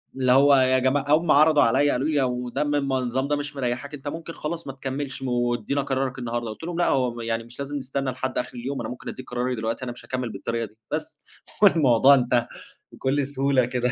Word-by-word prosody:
اللي 130 -1 +2
هو 140 +2 +6
يا 130 0 +4
جماعة 135 +2 +1
هُم 155 +2 +4
عرضُوا 155 +1 +6
عليّا 135 +5 +3
قالوا 135 +5 0
لي 155 -2 0
لو 125 -2 0
ده 150 - -1
من 145 0 0
النظام 130 -1 0
ده 145 - +1
مش 145 0 -5
مريحك 130 +2 -3
أنت 145 0 -8
ممكن 165 +2 -6
خلاص 165 0 -5
ما 135 - -5
تكملش، 135 0 -5
وادينا 120 +1 0
قرارَك 135 -1 -2
النهارده، 120 -1 -3
قُلت 110 - -9
لهم 170 0 -4
لأ، 175 - +2
هو 125 -3 0
يعني 115 0 -2
مش 120 +3 -14
لازم 145 +1 -3
نستنَّى 135 0 -2
لحد 130 +1 -4
آخر 125 - -3
اليوم، 135 +3 -4
أنا - - -5
ممكن 125 - -7
أديك 130 - -9
قراري 125 +1 -1
دلوقتي، 115 +3 -3
أنا 120 - -4
مش 120 - -12
هاكمِّل 125 -3 -3
بالطريقة 115 0 -3
دي 110 +1 -16
بس، - - -4 0.4
والموضوع 140 - +6
انتهى 120 -2 +1 0.4
بكُلّ 135 +1 -1
سهولة 135 -2 +1
كده، 125 -1 -1
130 Hz, 220 wpm, -24 LUFS, 125-145 Hz, 0.4 s, هو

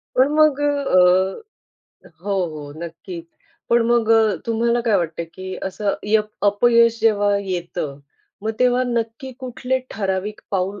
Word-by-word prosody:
पण 265 +3 +4
मग 305 -2 +4
अ, 285 -9 +2 1.1
अ - - -15
हो, 205 - -2 0.2
हो 145 -1 -8
नक्कीच. 170 0 -8 0.4
पण 235 0 +5
मग 235 -2 +2
अ, 220 -4 +4
तुम्हाला 235 +1 +1
काय 225 -3 +2
वाटतं, 170 -2 -2
की 185 0 -6
असं 200 +2 -2
यप 215 0 +1
अपयश 230 +2 +4
जेव्हा 205 -2 +3
येतं, 175 -7 -4 0.4
मग 220 - -1
तेव्हा 250 0 +3
नक्की 235 +2 -3
कुठले 255 0 -2
ठराविक 200 +1 -3
पाऊल 195 +1 -1
215 Hz, 140 wpm, -21 LUFS, 190-240 Hz, 1.1 s, पण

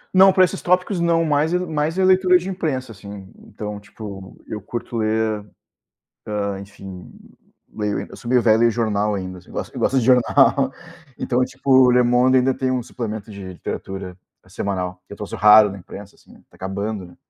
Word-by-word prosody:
Não, 190 +1 +8
pra 185 -1 +5
esses - - -5
tópicos 180 +1 +1
não 165 -1 +2
mais 155 +3 +1
é - - +2
mais 160 -1 -2
é 190 - +3
leitura 185 -1 +5
de 180 +2 -6
imprensa, 150 -10 -3
assim. 100 -1 -11
Então, 105 0 -7
tipo, 100 -2 -10
eu 105 -2 -6
curto 120 +2 -6
ler, 110 -1 0 0.9
hã, 100 -1 -2
enfim, 95 -2 -11 0.6
leio 105 -1 -2
eu - - -11
sou 120 - -11
meio 125 -1 +3
velho, 110 -1 +4
leio 120 0 +5
jornal 105 -2 0
ainda, 95 -1 -5
assim, 90 - -17
gosto - - -6
eu - - -6
gosto 135 - +1
de 115 - -1
jornal. 130 +1 +4 0.4
Então, 125 0 0
tipo, 135 +1 -4
o 130 -1 +7
Le 125 0 +4
Monde 125 +2 +4
ainda 130 +1 +2
tem 130 0 -2
um 125 -2 -1
suplemento 110 -2 -6
de 95 -2 -8
literatura 95 +1 -6 0.3
semanal 90 -2 -4
que - - -10
é - - -9
troço 105 - -7
raro 105 -1 +7
na 100 - -8
imprensa, 100 +2 -11
assim, - - -20 0.2
tá - - -22
acabando, 100 +1 -4
né, 90 - -16
110 Hz, 195 wpm, -21 LUFS, 100-135 Hz, 0.9 s, Não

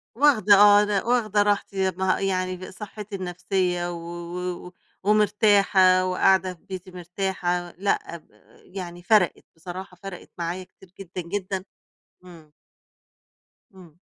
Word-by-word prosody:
واخدة 230 -7 +5
آه، 205 +1 +7
لأ 205 -2 0
واخدة 215 -4 +2
راحتي 205 -1 -1
يب 190 -2 0
ما 190 0 +1
يعني 185 -1 -1
ب 185 - -9
صحّتي 210 +1 -8
النفسية 180 -1 -2
و - - -5
و 175 +1 -6
و - - -12 0.3
ومرتاحة 200 -3 +4
وقاعدة 185 0 +2
في 170 - -23
بيتي 185 -1 -8
مرتاحة، 180 -1 -3
لأ 190 -3 -1
ب 155 - -23 0.5
يعني 175 -2 -7
فرَقِت 205 -3 +2
بصراحة، 180 +2 -9
فرَقِت 195 -2 -8
معايا 175 +2 -3
كتير 185 0 -20
جدًا، 185 -1 -6
جدًا. 190 +1 -4 0.6
إمم. 165 -4 -15 1.2
إمم. 175 -4 -16
185 Hz, 130 wpm, -24 LUFS, 175-200 Hz, 1.2 s, آه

